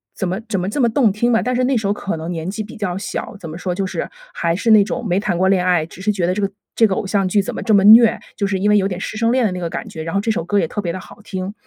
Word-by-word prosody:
怎 190 - -2
么 185 +3 -2
怎 215 -3 -1
么 180 +1 -2
这 250 - -3
么 245 - +4
动 230 -1 +3
听 235 +5 +1
吧。 225 - +3
但 250 - -1
是 250 +1 +1
那 265 +1 +1
时 220 -3 -1
候 - - +1
可 205 -2 -3
能 160 +2 -5
年 165 0 -4
纪 215 +3 -4
比 210 - -11
较 185 -4 -2
小， 200 - -5
怎 170 -5 -9
么 155 - -7
说， 180 0 -3
就 195 +1 -1
是， 190 - -4 0.2
还 170 0 0
是 225 +5 +1
那 215 -1 +8
种 220 - -4
没 185 -2 +1
谈 195 -4 -1
过 190 +2 +2
恋 185 -2 +2
爱， 175 -3 +2
只 170 +3 -13
是 210 +2 +1
觉 185 -4 -1
得 180 - +1
这 205 - -2
个 200 - 0 0.3
这 230 - +5
个 190 - -1
偶 - - -3
像 195 -1 +1
剧 200 +2 +2
怎 195 - -5
么 - - -4
这 220 - +2
么 200 -2 +5
虐， 220 +2 +8 0.2
就 205 - 0
是 195 -1 -1
因 205 +2 +1
为 210 - +5
有 195 -1 +2
点 185 -3 -4
师 215 - -5
生 230 +1 +2
恋 255 -2 +2
的 205 - +1
那 180 - -4
个 170 -2 -3
感 - - -5
觉， 160 - -7
然 165 - -5
后 - - +3
这 225 - -3
首 205 - -2
歌 205 +3 +1
也 170 - 0
特 205 - -4
别 175 -4 -2
地 185 - -5
好 - - -14
听。 190 -1 -5
195 Hz, 390 characters per minute, -19 LUFS, 180-215 Hz, 0.3 s, 那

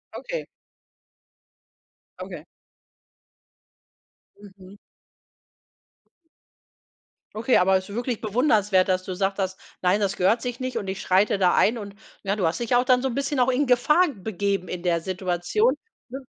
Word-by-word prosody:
Okay. - - -5 1.8
Okay. - - -8 2.0
Mhm. 195 0 -15 2.6
Okay, 230 +4 +2
aber 190 +1 +3
es 190 +1 -7
ist 200 - -7
wirklich 240 -1 -3
bewundernswert, 210 -5 +2
dass 185 0 0
du 185 - -6
gesagt 195 +2 -1
hast: 190 0 -2 0.2
„Nein, 185 +3 +2
das 195 -2 -1
gehört 215 +6 +2
sich 245 -1 -5
nicht 255 0 -3
und 195 - -4
ich 190 0 -4
schreite 195 +2 +2
da 180 -2 +3
ein“, 230 +3 +3
und 200 -2 -8 0.3
ja, 200 +1 -1
du 190 -5 -1
hast 165 - 0
dich 235 +1 +1
auch 245 +1 +3
dann 250 -1 +4
so 265 - -1
'n 235 - -5
bisschen 280 0 -1
auch 250 +1 +3
in 260 +2 +1
Gefahr 300 +8 +4
begeben 195 -1 -2
in 180 -1 -5
der 170 -2 +1
Situation, 185 - 0 0.3
ne? 265 +2 -6
205 Hz, 150 wpm, -24 LUFS, 185-250 Hz, 2.6 s, dann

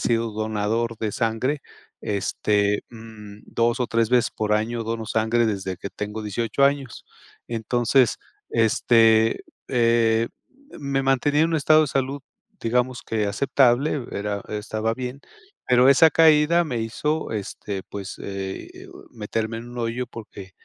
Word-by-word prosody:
sido 115 -1 0
donador 110 +2 -1
de 110 -2 -3
sangre, 125 +5 -1 0.4
este, 100 0 0
mm, 110 -3 -12
2 120 +1 0
o 125 - +1
3 115 -1 +1
veces 125 -1 +3
por 105 -1 -1
año 115 +2 -1
dono 115 0 -3
sangre 110 +2 +1
desde 95 -4 -2
que 100 - -7
tengo 105 +1 -5
18 115 +6 0
años. 140 -3 -1 0.4
Entonces, 120 +2 +2 0.3
este, 115 0 +3 0.2
eh, 115 -2 +2 0.5
me 140 -2 -1
mantenía 135 +3 +2
en 165 - +3
un 165 - 0
estado 155 +2 +5
de 155 - 0
salud, 135 +1 -2 0.4
digamos 125 +2 0
que 110 -2 -1
aceptable, 135 +4 +2
era 100 0 -3
estaba 110 +1 -2
bien, 130 +2 -6 0.5
pero 125 +1 +5
esa 160 +4 +7
caída 160 +2 +5
me 120 -7 -3
hizo, 150 +6 -2
este, 100 -2 -5
pues, 100 0 -7
eh, 95 -1 -6
o - - -13
meterme 110 +1 -3
en 120 +1 -8
un 120 - -8
hoyo 120 +2 -2
porque, 105 -5 -10
115 Hz, 140 wpm, -23 LUFS, 110-130 Hz, 0.5 s, esa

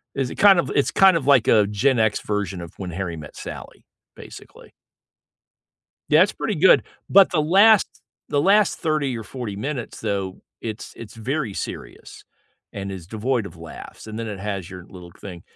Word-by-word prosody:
is 135 -2 -2
it - - -7
kind 200 -3 +6
of - - -1
it's 140 - +2
kind 190 -2 +5
of 140 -4 -2
like 135 -5 +5
a 105 -3 +4
Gen 115 +5 +1
X 110 -1 +1
version 100 -4 -3
of 85 +1 -10
When 95 -2 -6
Harry 85 -1 -4
Met 75 -2 -11
Sally, - - -9 0.3
basically. - - -13 1.4
Yeah, 155 +4 +6
it's 205 - +1
pretty 215 - -3
good, 180 +4 +5 0.3
but 195 0 +6
the 155 -4 +1
last 200 +6 +5 0.4
the 145 - +1
last 200 +5 +3
30 150 -6 -1
or 110 - -7
40 110 -3 -6
minutes, 130 +1 -5
though, 100 -3 -3 0.2
it's 110 -1 -7
it's 115 -1 -10
very 125 0 -3
serious, - - -8 0.5
and 100 -1 -6
is 90 -3 -9
devoid 115 +3 -1
of 95 - -12
laughs, 80 +6 -11
and 110 0 -7
then 115 -1 -4
it 100 -2 -6
has 100 -3 -5
your 90 -1 -10
little 90 -2 -12
thing. 90 -4 -9
110 Hz, 185 wpm, -22 LUFS, 95-150 Hz, 1.4 s, kind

